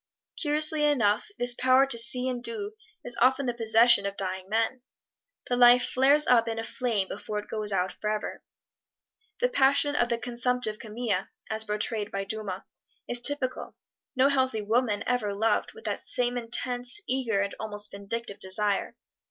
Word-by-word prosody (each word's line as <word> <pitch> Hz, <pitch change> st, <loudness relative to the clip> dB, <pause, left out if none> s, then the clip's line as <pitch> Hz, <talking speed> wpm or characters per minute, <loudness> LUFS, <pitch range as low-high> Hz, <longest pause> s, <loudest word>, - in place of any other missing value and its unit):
Curiously 305 Hz, 0 st, +1 dB
enough, 235 Hz, -, +2 dB
this 245 Hz, 0 st, +2 dB
power 255 Hz, +2 st, +4 dB
to 240 Hz, -4 st, 0 dB
see 250 Hz, +2 st, +3 dB
and 245 Hz, -2 st, -3 dB
do 425 Hz, -, -4 dB, 0.3 s
is 245 Hz, -, -3 dB
often 260 Hz, +2 st, +3 dB
the 245 Hz, -, -1 dB
possession 230 Hz, 0 st, +4 dB
of 200 Hz, -, -6 dB
dying 190 Hz, 0 st, -4 dB
men. 225 Hz, +4 st, 0 dB, 0.7 s
The 245 Hz, -, 0 dB
life 245 Hz, 0 st, +6 dB
flares 280 Hz, +4 st, +4 dB
up 235 Hz, -4 st, +4 dB
in 225 Hz, 0 st, -3 dB
a 225 Hz, -, -3 dB
flame 225 Hz, -5 st, -2 dB
before 210 Hz, +2 st, -6 dB
it 210 Hz, -, -5 dB
goes 215 Hz, -1 st, -2 dB
out 185 Hz, -1 st, 0 dB
forever. 215 Hz, 0 st, -4 dB, 1.0 s
The -, -, +4 dB
passion 285 Hz, -, +2 dB
of 240 Hz, -, +1 dB
the 235 Hz, -, 0 dB
consumptive 245 Hz, -2 st, 0 dB
Camille, 215 Hz, -3 st, -3 dB, 0.2 s
as 220 Hz, 0 st, -3 dB
portrayed 210 Hz, 0 st, -3 dB
by 195 Hz, 0 st, -3 dB
Dumas, 195 Hz, -2 st, -5 dB, 0.4 s
is 245 Hz, -, -3 dB
typical 255 Hz, 0 st, -2 dB, 0.4 s
no 265 Hz, +2 st, +4 dB
healthy 260 Hz, -6 st, 0 dB
woman 220 Hz, 0 st, 0 dB
ever 215 Hz, -5 st, -1 dB
loved 220 Hz, +3 st, 0 dB
with 450 Hz, 0 st, -14 dB
that -, -, -4 dB
same 245 Hz, -1 st, 0 dB
intense, 245 Hz, -, +1 dB
eager 250 Hz, -6 st, 0 dB
and 200 Hz, 0 st, -1 dB
almost 210 Hz, -1 st, -5 dB
vindictive 200 Hz, +2 st, -5 dB
desire. 200 Hz, +1 st, +1 dB
235 Hz, 165 wpm, -27 LUFS, 210-255 Hz, 1.0 s, life